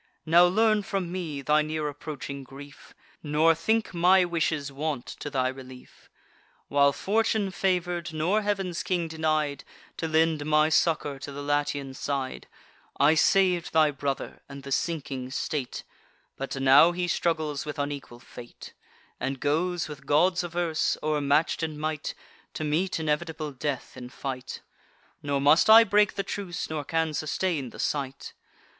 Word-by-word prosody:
Now 170 +2 +6
learn 215 +3 +3
from 195 -3 -3
me 160 -6 -4
thy 150 +2 +3
near 155 0 -2
approaching 145 -1 -6
grief, 140 +2 -13 0.3
Nor 155 +2 +3
think 220 +8 0
my 180 +2 +5
wishes 160 -4 -1
want 140 -2 -3
to 145 - -7
thy 130 -3 0
relief. 130 -1 -10 0.6
While 140 0 +4
fortune 210 +4 0
favour'd, 175 -2 -1
nor 170 +7 +1
Heav'n's 195 -4 -2
King 175 -3 -1
denied 155 -2 -1 0.3
To 165 - -2
lend 160 -1 +2
my 155 +1 +3
succour 150 -3 +1
to 145 - -7
the 145 +1 -7
Latian 145 -1 -1
side, 135 -1 -4 0.5
I 145 +2 +6
sav'd 180 +1 +2
thy 155 -2 +4
brother, 140 -1 -4
and 140 -1 -9
the 140 - -8
sinking 135 -5 -2
state: 135 -1 -3 0.5
But 135 +1 -5
now 135 +5 +6
he 175 0 -2
struggles 160 -4 -1
with 150 - -5
unequal 140 -4 -5
fate, 120 -2 -12 0.5
And 135 0 -3
goes, 165 +5 0
with 140 -3 -10
gods 175 +5 +3
averse, 175 -2 -1
o'ermatch'd 150 +1 +1
in 155 -2 -3
might, 155 0 -3 0.4
To - - -3
meet 165 +5 0
inevitable 155 0 -2
death 140 0 -4
in 125 0 -8
fight; 130 -1 -6 0.6
Nor 140 -1 -1
must 150 +8 +5
I 225 +1 +10
break 210 -1 +3
the 195 - -1
truce, 180 -6 -5
nor 155 -2 -3
can 160 +1 -1
sustain 155 -2 -2
the - - -13
sight. 140 -2 -3
155 Hz, 150 wpm, -27 LUFS, 140-175 Hz, 0.6 s, I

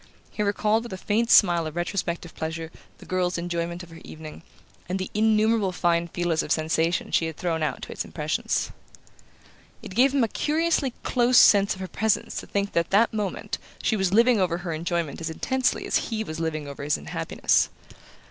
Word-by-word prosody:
He - - -4
recalled 210 +2 +1
with 235 -3 -8
a - - -4
faint 220 +4 0
smile 175 -7 +5
of 155 - -8
retrospective 175 -1 -3
pleasure 160 0 -5 0.3
the - - -14
girl's 185 -1 0
enjoyment 170 0 -3
of 170 - -13
her 165 - -12
evening, 155 0 -10 0.5
and 185 - 0
the 190 - -5
innumerable 215 -1 +2
fine 170 -1 +1
feelers 170 -1 0
of - - -6
sensation 160 +2 0
she 165 - +2
had 160 - -7
thrown 165 -2 -1
out 155 - -2
to - - -7
its - - -3
impressions. - - -2 1.1
It - - -8
gave 255 +6 +4
him 270 - +3
a - - +2
curiously 305 0 0
close 245 0 +3
sense 200 -1 +6
of 190 - -10
her 190 - -4
presence 220 +4 -1
to - - -10
think 200 0 -2
that 170 - +2
at - - -32
that 220 +4 +3
moment 210 -3 -3 0.2
she 220 - +2
was 190 -3 0
living 230 +2 +5
over 175 -2 +1
her 175 -1 -4
enjoyment 170 -1 -2
as 165 - -3
intensely 260 +10 0
as - - 0
he 220 -2 -2
was 160 -5 -6
living 155 -2 -3
over 140 0 -8
his 145 +1 +1
unhappiness. 75 - 0
180 Hz, 195 wpm, -25 LUFS, 165-215 Hz, 1.1 s, sense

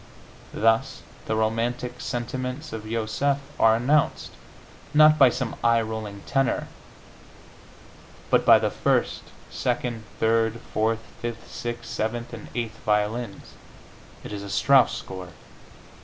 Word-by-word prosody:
Thus, 115 +1 +1 0.2
the 110 - 0
romantic 120 +3 -1
sentiments 125 +4 -4
of 110 -1 -6
Joseph 115 +5 0 0.2
are 110 0 +6
announced, 140 +6 +1 0.6
not 155 0 +7
by 135 -3 +8
some 120 -1 -3
eye 115 -1 +4
rolling 110 -2 -6
tenor, 135 -2 0 1.6
but - - +4
by - - +8
the - - 0
first, - - 0 0.3
second, 120 -2 -2
third, 115 0 +2
fourth, 110 +1 +1 0.2
fifth, 120 -1 -6
sixth, 120 0 -5
seventh 115 +2 -3
and 115 - -8
eighth 115 -3 -3
violins 105 0 -1 0.7
(it - - -7
is 100 - -5
a 100 - -7
Strauss 125 +7 +4
score!) 90 -2 -8
115 Hz, 120 wpm, -25 LUFS, 110-125 Hz, 1.6 s, by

